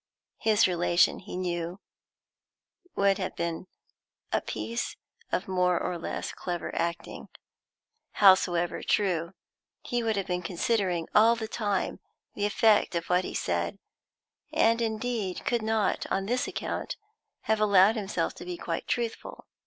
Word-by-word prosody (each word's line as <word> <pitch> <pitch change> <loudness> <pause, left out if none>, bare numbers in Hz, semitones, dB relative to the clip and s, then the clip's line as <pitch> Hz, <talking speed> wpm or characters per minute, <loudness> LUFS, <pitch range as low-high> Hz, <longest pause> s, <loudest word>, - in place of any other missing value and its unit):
His 220 -2 +4
relation, 175 -1 +2
he 190 -1 -7
knew, 175 0 -3 1.2
would 200 0 +3
have 185 - -3
been 170 +1 -3 0.7
a - - +2
piece 235 +1 -4 0.4
of - - -1
more 180 -2 +2
or 180 - -2
less - - -4
clever 175 -1 -4
acting, 170 0 -3 0.9
howsoever 175 -3 +4
true; 180 -4 0 0.5
he 240 0 -1
would 225 -1 0
have 195 -2 -1
been 180 0 -2
considering, 180 -1 0
all 225 +2 +6
the 225 -1 -4
time, 205 -4 -2 0.3
the 205 - 0
effect 210 -3 +3
of 170 +1 -2
what 180 +1 +3
he - - -6
said, - - -1 0.7
and, 230 +1 +3
indeed, 220 -4 -2
could 240 -2 +1
not, 220 -1 0
on 195 0 0
this 245 +4 0
account, - - -4 0.4
have 220 0 0
allowed 200 +1 +6
himself 195 -6 -2
to - - -10
be 180 0 -5
quite 165 -1 -4
truthful. 235 -2 -3
195 Hz, 135 wpm, -28 LUFS, 175-220 Hz, 1.2 s, all